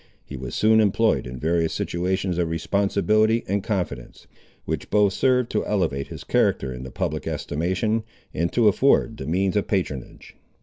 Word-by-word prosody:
He 70 - -8
was 65 -1 -6
soon 110 +1 +4
employed 110 - +2
in 65 +1 -7
various 80 +3 0
situations 90 0 -1
of 85 -2 0
responsibility 100 +6 +1
and 100 +1 -1
confidence, 90 - -4 0.4
which - - -4
both 105 -2 +3
served 125 0 +2
to 105 - 0
elevate 80 -10 -1
his - - -9
character 65 -2 +1
in 60 - -8
the 65 - -7
public 65 - -3
estimation, 95 +8 -1 0.3
and 85 +2 -1
to 120 -3 +3
afford 115 +1 +3
the - - -6
means 95 +4 0
of 105 - 0
patronage. 80 - -4
95 Hz, 165 wpm, -23 LUFS, 80-110 Hz, 0.4 s, soon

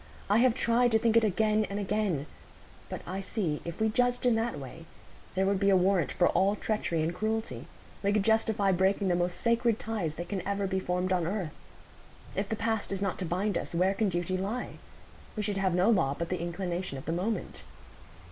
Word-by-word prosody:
I 210 - +5
have 245 -1 +4
tried 240 0 +3
to - - +7
think 225 0 +1
it 230 - +6
again 215 +1 +2
and 200 - -3
again; 200 -7 -1 0.6
but - - -5
I 190 +2 -4
see, 180 -7 -2
if 170 0 -6
we 220 - +3
judged 245 +3 +1
in 245 - +5
that 225 -4 -1
way, 145 +4 -9 0.5
there 190 +1 +2
would 195 0 +1
be 200 0 +3
a 195 - +6
warrant 185 -2 +2
for 175 - +3
all 195 +2 +2
treachery 200 -7 -1
and 165 +2 -1
cruelty; 220 +4 -3 0.3
we 200 - +1
should 205 -1 +2
justify 220 -2 +2
breaking 190 +1 +2
the 175 - +3
most 175 0 -1
sacred 235 -1 +2
ties 205 -10 -3
that 175 +2 -5
can 195 -3 -3
ever 200 +2 -1
be 190 0 0
formed 180 0 -1
on 175 -3 +1
earth. 185 -5 -3 0.8
If 195 +1 -2
the 220 - 0
past 220 -2 -1
is 195 0 -2
not 195 - -2
to 185 - -2
bind 185 +3 0
us, - - -6
where 185 +3 +3
can 205 0 +1
duty 180 +1 -1
lie? 215 +6 -4 0.6
We 215 - -2
should 205 -1 -1
have 190 -2 +1
no 180 +3 +3
law 160 -10 +2
but 170 - -3
the 180 -2 -2
inclination 175 -2 -3
of 135 - -9
the 160 - -2
moment." 195 +6 -3
195 Hz, 215 wpm, -29 LUFS, 180-215 Hz, 0.8 s, to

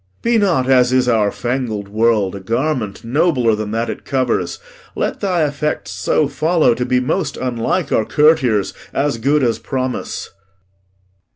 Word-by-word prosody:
Be 235 -1 +3
not, 170 -11 +1
as 125 -2 +4
is 130 -1 +2
our 110 -4 +3
fangled 120 -5 -3
world, 105 -2 +1
a - - -6
garment 115 +1 -2
Nobler 125 -2 +2
than 105 0 -3
that 115 +2 -1
it - - -6
covers. 125 -9 -1 0.4
Let - - -2
thy 180 -5 +1
effects 145 -6 -3
So 100 +10 +1
follow 155 0 +2
to 125 +1 -2
be 125 0 +2
most 145 +2 -2
unlike 130 +7 -1
our 110 - +2
courtiers, 125 -5 +2 0.2
As 140 -4 0
good 140 +4 +2
as 115 -3 +1
promise. 130 -2 -4
125 Hz, 155 wpm, -18 LUFS, 115-145 Hz, 0.4 s, as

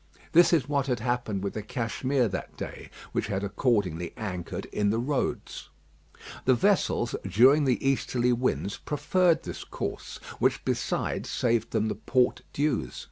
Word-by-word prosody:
This 175 +2 +6
is 160 -6 +3
what 140 -2 0
had 125 -3 0
happened 115 -4 -1
with 100 - -2
the 110 - -3
Cashmere 125 +4 0
that 95 - -6
day, - - -7 0.2
which - - -1
had 100 -2 -2
accordingly 100 - 0
anchored 90 -5 -4
in 105 -1 +1
the 110 - +1
roads. 130 +3 -2 0.8
The 130 - +5
vessels, 175 - +2
during 130 - +5
the 130 +1 +1
easterly 125 -2 +1
winds, 120 -5 -1
preferred 165 +3 +1
this - - -6
course, - - -5 0.2
which - - +1
besides - - -1
saved 115 -2 +1
them 110 -1 0
the 110 - -1
port 125 -1 +1
dues. 135 - -1
120 Hz, 150 wpm, -27 LUFS, 105-135 Hz, 0.8 s, This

